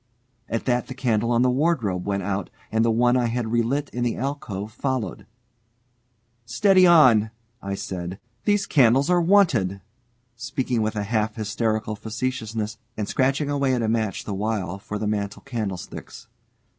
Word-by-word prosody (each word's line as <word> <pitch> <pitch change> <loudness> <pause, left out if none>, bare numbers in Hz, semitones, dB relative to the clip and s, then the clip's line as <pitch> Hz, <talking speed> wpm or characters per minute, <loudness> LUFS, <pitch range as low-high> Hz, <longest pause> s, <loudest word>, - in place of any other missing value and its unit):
At 115 - -2
that 125 -1 +1
the 130 - -7
candle 115 -3 0
on 120 0 +3
the 125 - +4
wardrobe 125 - 0
went 100 -1 -1
out, 100 0 -2 0.2
and 110 0 +2
the 115 - +3
one 120 +2 +3
I 125 -2 +2
had 115 -1 -2
relit 120 +5 +1
in 120 - -2
the 120 - 0
alcove 115 -7 -4
followed. 130 -5 -3 1.2
"Steady 185 - +4
on!" 125 -11 +6 0.3
I 100 0 -3
said. 90 0 -5 0.3
"These 205 -1 +2
candles 135 +3 +4
are 175 -1 +4
wanted," 155 - +3 0.6
speaking 125 -1 -2
with 110 0 -1
a 105 - -1
half 110 0 -1
hysterical 110 0 -1
facetiousness, 110 -1 -4 0.2
and 105 -2 -2
scratching 135 +2 +1
away 140 -2 +1
at 120 - -1
a - - 0
match 110 -3 -1
the 105 - -4
while 100 -2 -2
for 105 +1 -5
the 105 - -3
mantel 105 -1 -2
candlesticks. 110 -10 -6
115 Hz, 160 wpm, -24 LUFS, 105-130 Hz, 1.2 s, on